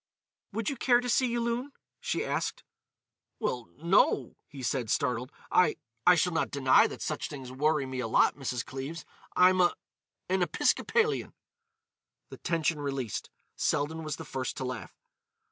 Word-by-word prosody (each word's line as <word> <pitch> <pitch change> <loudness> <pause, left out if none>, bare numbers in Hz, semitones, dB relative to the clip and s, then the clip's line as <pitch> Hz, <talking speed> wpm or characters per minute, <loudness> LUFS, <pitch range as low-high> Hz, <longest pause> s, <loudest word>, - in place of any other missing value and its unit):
"Would 220 +1 -3
you 280 - -1
care 240 0 +4
to 245 - -4
see 250 +1 +3
Yulun?" 240 +3 -1 0.3
she 485 0 -1
asked. - - -2 0.8
"Well—no," 155 - +1
he 140 -4 -9
said, 125 -3 -1
startled. 125 +4 0 0.2
"I—I 150 -3 +3
shall 180 0 +1
not 165 - 0
deny 135 -2 +5
that - - -7
such - - -3
things 130 -3 -8
worry 150 +2 +1
me 130 -1 -5
a 120 - -1
lot, - - +4
Mrs. 125 -4 -3
Cleves. 135 +5 -6 0.3
I'm 185 0 +6
a—an 180 +1 -2
Episcopalian." 445 - +1 0.9
The - - -9
tension 165 -3 0
released, 135 -6 -3 0.3
Selden 160 +3 0
was 155 -2 -3
the - - -8
first 130 -1 -4
to - - -3
laugh. 125 -3 -6
155 Hz, 145 wpm, -29 LUFS, 130-185 Hz, 0.9 s, I'm